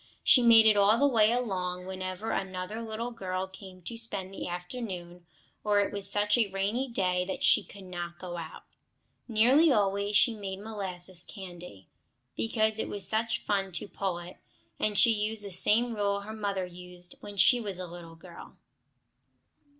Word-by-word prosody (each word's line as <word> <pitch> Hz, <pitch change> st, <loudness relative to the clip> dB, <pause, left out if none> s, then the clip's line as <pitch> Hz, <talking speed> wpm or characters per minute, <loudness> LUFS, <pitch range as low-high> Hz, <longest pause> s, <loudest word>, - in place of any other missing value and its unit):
She 255 Hz, -, +6 dB
made 230 Hz, -2 st, +7 dB
it 215 Hz, -1 st, +6 dB
all 205 Hz, +2 st, +5 dB
the 285 Hz, -, +3 dB
way 225 Hz, -5 st, +4 dB
along, 180 Hz, -7 st, -2 dB
whenever 185 Hz, +2 st, -4 dB
another 190 Hz, +3 st, -3 dB
little 230 Hz, +2 st, -4 dB
girl 185 Hz, -4 st, -3 dB
came 190 Hz, -1 st, -13 dB
to 230 Hz, +5 st, -6 dB
spend 200 Hz, -4 st, -5 dB
the -, -, -5 dB
afternoon, 175 Hz, -2 st, -6 dB, 0.4 s
or 210 Hz, -1 st, +3 dB
it 200 Hz, -, 0 dB
was 200 Hz, -1 st, -2 dB
such 210 Hz, +2 st, +4 dB
a 225 Hz, -, +3 dB
rainy 200 Hz, +7 st, -1 dB
day 180 Hz, -6 st, 0 dB
that 190 Hz, -, -5 dB
she -, -, +6 dB
could 200 Hz, -1 st, -12 dB
not 175 Hz, -2 st, -6 dB
go 175 Hz, -1 st, -7 dB
out. 160 Hz, -1 st, -8 dB, 0.6 s
Nearly 255 Hz, +8 st, +5 dB
always 200 Hz, -2 st, +1 dB
she 230 Hz, +3 st, +4 dB
made 195 Hz, -3 st, -6 dB
molasses 190 Hz, -4 st, -5 dB
candy, 175 Hz, -, -10 dB, 0.5 s
because 215 Hz, -, +1 dB
it -, -, -2 dB
was 200 Hz, -2 st, -1 dB
such 220 Hz, +1 st, +1 dB
fun 195 Hz, -2 st, -1 dB
to 175 Hz, -, -5 dB
pull 195 Hz, -3 st, -3 dB
it, 175 Hz, +1 st, -10 dB, 0.4 s
and 210 Hz, -1 st, 0 dB
she 230 Hz, -, +7 dB
used 210 Hz, 0 st, -2 dB
the 200 Hz, -, -7 dB
same 230 Hz, +6 st, +3 dB
rule 200 Hz, -1 st, 0 dB
her 215 Hz, +2 st, -8 dB
mother 200 Hz, -3 st, -2 dB
used 180 Hz, 0 st, -7 dB
when 205 Hz, 0 st, -10 dB
she 245 Hz, +5 st, +6 dB
was 200 Hz, -4 st, -3 dB
a 185 Hz, -, -4 dB
little 170 Hz, -1 st, -11 dB
girl. 170 Hz, +1 st, -13 dB
200 Hz, 175 wpm, -29 LUFS, 180-220 Hz, 0.6 s, made